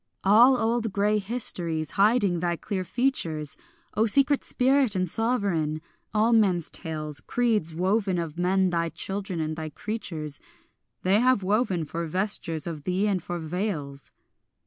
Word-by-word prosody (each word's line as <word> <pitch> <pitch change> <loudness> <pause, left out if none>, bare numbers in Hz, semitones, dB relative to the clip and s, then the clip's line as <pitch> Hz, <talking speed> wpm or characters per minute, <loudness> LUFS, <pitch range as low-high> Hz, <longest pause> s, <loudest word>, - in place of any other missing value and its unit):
All 235 +7 +6
old 225 -1 0
grey 205 +2 +1
histories 175 -8 -2
hiding 200 -3 +3
thy 175 0 0
clear 190 +2 -4
features, 170 - -1 0.4
O 220 +2 +2
secret 275 +5 +3
spirit 260 -3 +2
and 185 -1 0
sovereign, 190 -8 0 0.3
all 220 +2 +2
men's 190 -7 +2
tales, 155 -3 -4
Creeds 215 -7 0
woven 190 +2 +1
of 165 -3 -4
men 185 +1 +2
thy 170 -1 0
children 195 0 -3
and 155 0 -2
thy 155 0 -5
creatures, 160 -7 -5 0.6
They 190 +3 +4
have 255 -4 +3
woven 195 -4 +1
for 165 +3 -4
vestures 170 -3 +1
of 165 -3 -5
thee 185 +6 0
and 195 -3 0
for 175 +2 -5
veils. 160 -5 -4
190 Hz, 145 wpm, -26 LUFS, 165-220 Hz, 0.6 s, All